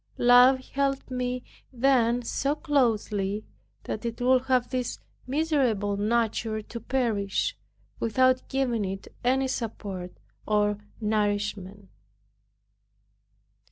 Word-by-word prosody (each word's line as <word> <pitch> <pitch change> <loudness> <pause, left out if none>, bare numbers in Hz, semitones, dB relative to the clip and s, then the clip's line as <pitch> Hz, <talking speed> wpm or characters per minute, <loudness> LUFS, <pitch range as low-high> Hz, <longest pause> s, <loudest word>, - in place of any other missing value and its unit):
Love 250 +2 +6
held 275 -1 -1
me 250 0 -2 0.3
then 245 -2 +2
so 275 +5 -1
closely, 215 -9 0 0.4
that - - -5
it 235 -1 -4
would 255 +1 +4
have 255 -2 +1
this 250 -2 -2 0.3
miserable 260 -9 +1
nature 220 +1 0
to 235 +2 -8
perish, 230 - -1 0.4
without 255 +3 +3
giving 255 -5 0
it 195 0 -5 0.2
any 265 +2 +2
support 200 -7 -4 0.4
or 210 -1 +2 0.2
nourishment. 205 -2 -1
235 Hz, 95 wpm, -27 LUFS, 210-260 Hz, 0.4 s, Love